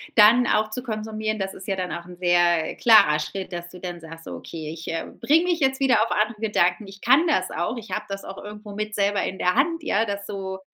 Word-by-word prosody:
dann 230 +3 +7
auch 215 0 +1
zu 250 +2 -5
konsumieren, 215 -1 -3
das 195 0 -3
ist 190 - -11
ja 195 - 0
dann 180 -1 -3
auch 170 0 -6
sehr 175 -2 +2
klarer 215 -10 +6
Schritt, 190 +4 -5
dass 175 0 -6
du 180 - -12
dann 175 -2 -6
sagst: 165 0 -11
„So, - - -7
okay, 155 -2 -7
ich, 165 0 -10
äh, 165 - -3 0.2
bringe 320 +4 +4
mich 345 -2 +1
jetzt 265 -1 +2
wieder 255 -5 +4
auf 230 - -4
andere 215 +1 0
Gedanken. 205 -2 +1
Ich 195 0 -12
kann 275 +8 +4
das 185 - +1
auch. 175 +9 -2
Ich 225 -1 -9
habe 210 - -2
das 195 0 -6
auch 195 - -8
irgendwo 210 0 -9
mit 215 +1 -4
selber 200 -1 +1
in 190 - -3
der 180 0 +2
Hand, 330 +5 +1
ja, 220 -6 +1
das 200 -1 -4
so 190 -1 -5
205 Hz, 245 wpm, -24 LUFS, 180-225 Hz, 0.2 s, dann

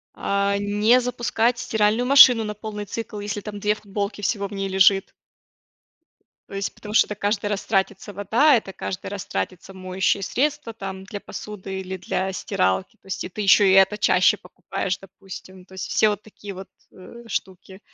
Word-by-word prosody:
а, 200 0 0
не 210 +4 +3
запускать 240 -1 0
стиральную 220 +3 +1
машину 255 -4 +8
на 210 -1 -4
полный 210 -1 -6
цикл, 215 +1 -6
если 205 0 -4
там 205 0 -7
2 210 +1 +1
футболки 205 0 -4
всего 200 0 -1
в 195 - -12
ней 195 0 -2
лежит. 190 +1 +4 1.4
То - - -12
есть 195 0 -3
потому 210 0 -9
что - - +5
это 210 - -5
каждый 205 +1 -1
раз 205 -1 -3
тратится 195 0 -1
вода, 225 +10 +4
это 215 -4 -2
каждый 185 0 -6
раз 200 -2 -5
тратится 180 - -4
моющие 190 +1 -1
средства, 290 +2 -1
там 190 -2 -7
для 205 +1 -7
посуды 195 -2 -7
или 190 0 -6
для 190 +1 -2
стиралки. 95 - -1
То - - -21
есть 190 - -4
и - - -6
ты 210 - -6
еще 200 0 +6
и 190 - +5
это 195 +2 +5
чаще 185 -3 +4
покупаешь, 180 +1 -4
допустим. 190 -1 -12
То 190 - -18
есть 190 -2 -5
все 215 - +3
вот 205 0 -3
такие 205 -1 -10
вот, 190 +1 -10 0.2
э, 235 +6 -13
штуки. 190 -2 -5
200 Hz, 185 wpm, -23 LUFS, 190-210 Hz, 1.4 s, машину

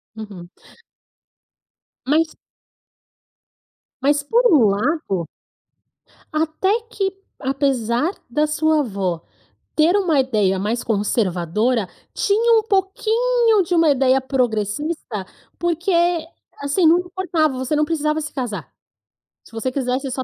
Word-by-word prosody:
Uhum. 200 -6 -9 1.6
Mas 315 +4 +1 1.7
Mas 285 +2 +2
por 465 +12 +2
um 285 -9 +6
lado 200 - -1 1.1
até 325 +8 0
que, 390 -4 -2 0.2
apesar 265 +1 0 0.2
da 300 +6 +1
sua 315 +1 +2
avó 195 - -2 0.5
ter 320 +4 +4
uma 345 -8 +2
ideia 210 -7 +1
mais 220 +5 -2
conservadora, 210 +1 0 0.3
tinha 450 +3 +3
um - - -3
pouquinho 445 +3 +2
de 355 - -3
uma 330 -2 +4
ideia 265 -1 +3
progressista, 245 - -2 0.3
porque, 345 +2 -1 0.7
assim, 285 +6 +1
não 330 +2 +6
importava, 350 -6 -1
você 260 +3 -1
não 300 0 +2
precisava 305 -1 -1
se 300 - -6
casar. 245 -6 -5 0.7
Se - - -19
você 225 +3 -2
quisesse 260 +1 -2
só 260 +1 -2
285 Hz, 110 wpm, -20 LUFS, 230-335 Hz, 1.7 s, um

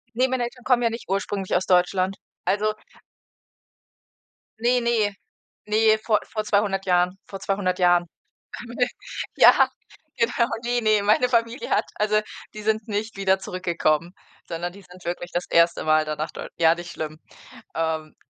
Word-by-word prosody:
Ne, 255 +2 +3
meine 255 -1 0
Eltern 240 +1 -8
kommen 250 -2 +3
ja 230 - +2
nicht 230 +1 -7
ursprünglich 195 0 -1
aus 180 - 0
Deutschland. 185 +1 +2 0.3
Also 215 +1 +1 1.8
Ne, 245 +2 +2
ne, 225 -4 +1 0.5
ne, 215 +1 +4
vor 215 -2 +3
vor 215 -2 -2
200 200 -2 +1
Jahren 180 +1 +2
vor 195 - -8
200 195 -2 -1
Jahren 175 -1 +4 0.5
kamen 240 0 -8
wir 245 -1 +3 0.5
ja, - - +7 0.5
genau 235 0 +1 0.2
ne, 240 0 +1
ne, 215 -2 +3
meine 215 +5 +3
Familie 235 - 0
hat - - +2
also, 215 0 +2 0.3
die 215 - -7
sind 220 0 0
nicht 215 +1 -3
wieder 195 -1 +2
zurückgekommen, 170 -3 -1 0.4
sondern 175 +1 -4
die 200 +2 -14
sind 180 0 -16
wirklich 175 0 -4
das 175 +1 -2
1. 170 0 +3
Mal 155 0 +3
dann 155 0 -4
nach 155 +1 -2
Deu - - -7
ja, 165 -1 +5
nicht 170 0 -8
schlimm. 155 0 -6 0.6
Ähm, 160 -1 -2
195 Hz, 160 wpm, -24 LUFS, 175-225 Hz, 1.8 s, ja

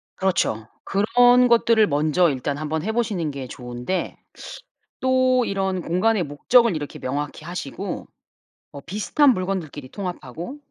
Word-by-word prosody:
그렇죠. 120 - 0 0.2
그런 245 +5 +4
것들을 230 -2 +4
먼저 155 +4 +2
일단 140 +1 -2
한번 155 +1 -2
해 220 - -1
보시는 205 -9 -1
게 135 -2 -6
좋은데 125 +8 -4 0.8
또 255 -1 +3
이런 190 -2 -1
공간의 185 +4 +1
목적을 200 - +3
이렇게 145 -2 -6
명확히 145 +3 -4
하시고 145 -8 -5 0.6
뭐 140 - -9
비슷한 215 - +2
물건들끼리 180 - -4
통합하고 175 - -6
180 Hz, 295 characters per minute, -23 LUFS, 145-225 Hz, 0.8 s, 그런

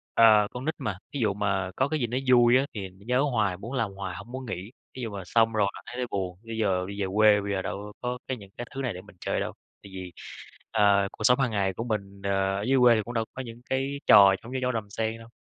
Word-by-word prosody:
Ờ, 110 -2 +7
con 125 +3 -6
nít 160 - 0
mà, 100 -3 -3 0.2
thí 145 - -3
dụ 105 -4 +2
mà 95 -2 -1
có 130 - +2
cái 155 0 -1
gì 120 - 0
nó 125 +3 -2
vui 120 0 +6
á, 135 - +2
thì 95 -3 -5
nó 95 +2 -19
nhớ 125 +2 +3
hoài, 105 -6 +1
muốn 115 +7 -8
làm 115 -6 -1
hoài 95 -2 -6
hổng 120 - -10
muốn 130 0 -6
nghỉ, 95 +2 -6 0.2
thí 130 - -6
dụ 115 - -3
mà 100 -1 -5
xong 115 +3 +3
rồi 105 -2 +2
mà - - -9
thấy 125 - -8
là 125 - 0
buồn, 90 -2 -3
bây 115 0 -6
giờ 95 -4 +1
đi 100 0 -5
về 95 - 0
quê 105 -1 +6
bây 100 0 -3
giờ 95 - 0
đâu 105 +2 -5
có 125 0 -2
cái 130 - -2
những 100 -2 -13
cái 120 0 -5
thứ 135 - -3
này 120 -6 -1
để 90 - -8
mình 105 -2 -17
chơi - - -1
đâu. - - -3 0.3
Tại 100 - -12
vì, 95 -1 -7 0.6
ờ, 100 -1 +4
cuộc 110 - -8
sống 125 +4 +5
hàng 130 -4 +1
ngày 95 -2 0
của 115 - -4
mình, 100 -4 -4
ờ, 100 - -1 0.3
ở - - -2
dưới 135 - +4
quê 120 -2 +7
thì 110 - +1
cũng 120 - -6
đâu 115 -1 0
có 130 - -5
những 120 -1 -9
cái 135 +2 -1
trò 100 -1 +8
giống 120 - -9
như 130 - -2
trong 125 -1 0
Đầm 110 -3 -3
Sen 110 +2 -2
đâu, 115 - -13
110 Hz, 295 wpm, -27 LUFS, 100-125 Hz, 0.6 s, trò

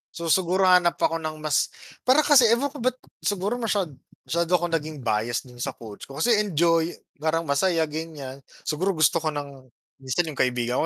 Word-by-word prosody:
So, 170 -1 -2
siguro 185 +2 +2
hanap 180 -2 +5
ako 165 0 0
ng 155 -1 -6
mas 145 -2 +2 0.4
para 285 +4 +5
kasi 270 -6 +6
ewan 255 +5 +2
ko 290 - -10
ba 245 - -1
ba't - - -35 0.2
siguro 205 +5 -1
masyad 200 -8 -1 0.3
masyado 170 +1 -1
ako 175 0 +1
naging 155 -4 -3
bias 115 +2 0
do'n 125 -2 -15
sa - - -3
coach 110 -3 -10
ko 135 - -11
kasi 230 +2 +3
enjoy, 170 -3 +1 0.2
parang 160 +2 0
masaya 160 +3 +1
ganiyan. 150 -4 -6 0.2
Siguro 180 +5 -1
gusto 155 +2 +3
ko 160 - -3
ng 140 -3 -5 0.3
minsan 130 +6 0
yung 140 - -11
kaibigan 125 0 +1
165 Hz, 190 wpm, -25 LUFS, 140-185 Hz, 0.4 s, kasi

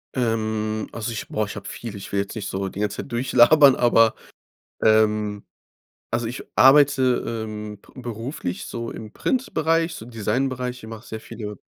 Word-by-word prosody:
Ähm, 110 -3 -1
also 115 0 -3
ich, 110 -3 -5
boah, 110 - -1
ich 105 - -8
habe 100 - -8
viel. 115 -3 -7
Ich 100 - -9
will 100 - 0
jetzt 100 - -7
nicht 105 -4 -4
so 95 0 -3
die 95 - -8
ganze 105 -1 -1
Zeit - - -14
durchlabern, 130 +3 +6
aber, 115 -2 +4 0.7
ähm 105 -1 +3 0.7
also 115 0 0
ich 120 +3 -5
arbeite, 135 -2 +5 0.2
ähm, 105 -1 -7
be 130 - -13
beruflich 115 - -5
so 115 0 -5
im 110 -1 -9
Printbereich, 165 - 0
so 115 - -9
Designbereich. 125 +2 -2
Ich 110 - -10
mache 115 0 -9
sehr 110 - -6
viele 105 -3 -8
115 Hz, 170 wpm, -23 LUFS, 105-125 Hz, 0.7 s, durchlabern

